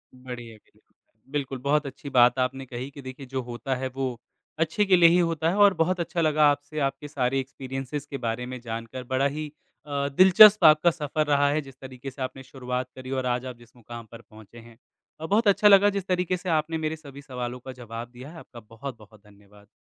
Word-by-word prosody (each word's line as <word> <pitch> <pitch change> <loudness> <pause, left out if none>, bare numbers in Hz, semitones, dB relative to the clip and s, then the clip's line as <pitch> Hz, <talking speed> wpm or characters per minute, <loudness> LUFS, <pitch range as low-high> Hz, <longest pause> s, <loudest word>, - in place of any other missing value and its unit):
बढ़िया 125 -3 -9
के - - -30 0.5
बिल्कुल, 135 -2 -3
बहुत 145 +2 +1
अच्छी 140 +1 -8
बात 125 0 +4
आपने 130 +1 -1
कही 125 +1 -6
कि 140 - -11
देखिए 130 +1 -9
जो 130 0 -4
होता 120 +2 -4
है 130 +1 -3
वो, 130 -3 -3 0.4
अच्छे 165 +6 +1
के 190 -1 +5
लिए 170 -1 +7
ही 175 +1 +4
होता 165 -1 +1
है 180 - -1
और 205 -2 +6
बहुत 175 +2 0
अच्छा 170 0 -2
लगा 155 -1 +4
आपसे 145 +2 -5
आपके 145 +2 -11
सारे 135 -2 -1
एक्सपीरियन्सिज़ 135 +2 -6
के 140 - -4
बारे 115 +2 -2
में 130 0 -7
जानकर। 115 +2 -6
बड़ा 130 +2 0
ही 150 +1 -5 0.3
अ, 140 -1 -2
दिलचस्प 195 +2 +8
आपका 155 +2 +6
सफ़र 155 -1 -2
रहा 145 -1 +3
है, 155 +1 0
जिस 135 -2 -14
तरीके 130 0 -8
से 135 - -12
आपने 130 +1 -5
शुरुआत 125 -1 -5
करी 130 0 -9
और 130 -1 -2
आज 125 +1 -1
आप 125 - -6
जिस 120 0 -20
मुक़ाम 120 -1 -10
पर 115 0 -11
पहुँचे 110 +1 -16
हैं 115 0 -15 0.4
अ, 160 - -5
बहुत 210 +5 +2
अच्छा 200 +1 +5
लगा 200 0 +7
जिस 200 -2 -4
तरीके 180 0 0
से 180 0 -6
आपने 160 +1 -3
मेरे 160 0 -2
सभी 140 -3 -12
सवालों 125 -2 -6
का 130 +1 -9
जवाब 120 -1 -8
दिया 125 +3 -11
है। 165 - -11
आपका 120 - -13
बहुत-बहुत 110 -1 -11
धन्यवाद। 105 0 -20
135 Hz, 220 wpm, -26 LUFS, 125-155 Hz, 0.5 s, दिलचस्प